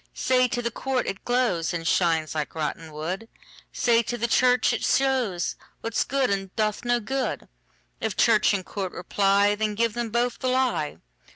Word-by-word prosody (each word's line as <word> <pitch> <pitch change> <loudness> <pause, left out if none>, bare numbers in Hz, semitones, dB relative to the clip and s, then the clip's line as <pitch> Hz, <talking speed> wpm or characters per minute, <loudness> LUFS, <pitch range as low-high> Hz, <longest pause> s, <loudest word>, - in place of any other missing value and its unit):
Say 255 -1 +3
to 245 0 -3
the 235 - -1
court, 260 +2 -1
it 195 - -5
glowsAnd 175 -9 0
shines 165 -3 +1
like 155 0 -3
rotten 160 +1 -4
wood; 180 +9 -5 0.4
Say 235 -1 +3
to 240 +1 -4
the 235 +1 0
church, 250 +1 +3
it - - -2
showsWhat's 230 -3 -1
good, 270 -4 +1
and 195 -1 -3
doth 215 -1 0
no 240 0 +2
good:If 225 -3 -5
church 215 -3 +4
and 190 -3 -1
court 190 -3 -4
reply, 200 +2 +2
Then 210 0 -1
give 230 0 +1
them 240 0 -3
both 240 +2 0
the 255 - -2
lie. 250 - 0
220 Hz, 165 wpm, -25 LUFS, 185-245 Hz, 0.4 s, church